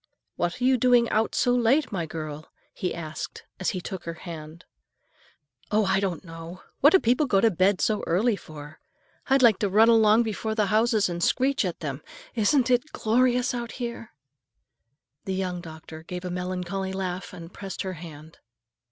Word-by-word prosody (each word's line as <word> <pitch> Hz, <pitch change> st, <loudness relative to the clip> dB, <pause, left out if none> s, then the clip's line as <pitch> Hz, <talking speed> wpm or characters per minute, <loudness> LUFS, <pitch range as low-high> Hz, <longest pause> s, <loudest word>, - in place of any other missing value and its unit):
"What 175 Hz, +5 st, -2 dB
are -, -, -3 dB
you 260 Hz, 0 st, +4 dB
doing 245 Hz, -1 st, +4 dB
out 220 Hz, +1 st, +1 dB
so 245 Hz, -, +2 dB
late, 245 Hz, +5 st, +2 dB
my 175 Hz, -5 st, -2 dB
girl?" 155 Hz, -1 st, -7 dB, 0.2 s
he 180 Hz, -, -3 dB
asked 155 Hz, -2 st, -6 dB, 0.2 s
as 185 Hz, -, 0 dB
he 185 Hz, -, -3 dB
took 185 Hz, 0 st, -7 dB
her 165 Hz, 0 st, -5 dB
hand. 160 Hz, -1 st, -9 dB, 1.0 s
"Oh, 215 Hz, 0 st, +2 dB
I 190 Hz, 0 st, +2 dB
don't 190 Hz, -2 st, -3 dB
know. 165 Hz, +2 st, -10 dB, 0.2 s
What 290 Hz, -, +7 dB
do 380 Hz, -, +7 dB
people 250 Hz, +4 st, +2 dB
go 200 Hz, -6 st, +3 dB
to 225 Hz, +3 st, +4 dB
bed 185 Hz, +2 st, +2 dB
so 215 Hz, -1 st, +1 dB
early 205 Hz, +7 st, +2 dB
for? 155 Hz, -4 st, -11 dB, 0.5 s
I'd 270 Hz, -1 st, +3 dB
like 225 Hz, -5 st, +6 dB
to 205 Hz, -, 0 dB
run 220 Hz, +4 st, +5 dB
along 225 Hz, 0 st, +5 dB
before 220 Hz, 0 st, -3 dB
the 215 Hz, -2 st, +2 dB
houses 220 Hz, -1 st, +3 dB
and 175 Hz, -1 st, -3 dB
screech 270 Hz, +7 st, +2 dB
at -, -, -4 dB
them. -, -, -4 dB, 0.3 s
Isn't 245 Hz, +3 st, +2 dB
it 250 Hz, +5 st, +1 dB
glorious 250 Hz, +3 st, +2 dB
out 235 Hz, -1 st, -4 dB
here?" 235 Hz, -2 st, -6 dB, 1.2 s
The 190 Hz, -, -2 dB
young 180 Hz, -2 st, -3 dB
doctor 160 Hz, -1 st, -10 dB
gave 180 Hz, +2 st, -7 dB
a 180 Hz, -, -3 dB
melancholy 180 Hz, +1 st, -3 dB
laugh 185 Hz, -1 st, -4 dB
and 170 Hz, +1 st, -10 dB
pressed 195 Hz, 0 st, -6 dB
her 190 Hz, -1 st, -4 dB
hand. 160 Hz, -2 st, -11 dB
195 Hz, 180 wpm, -26 LUFS, 175-235 Hz, 1.2 s, What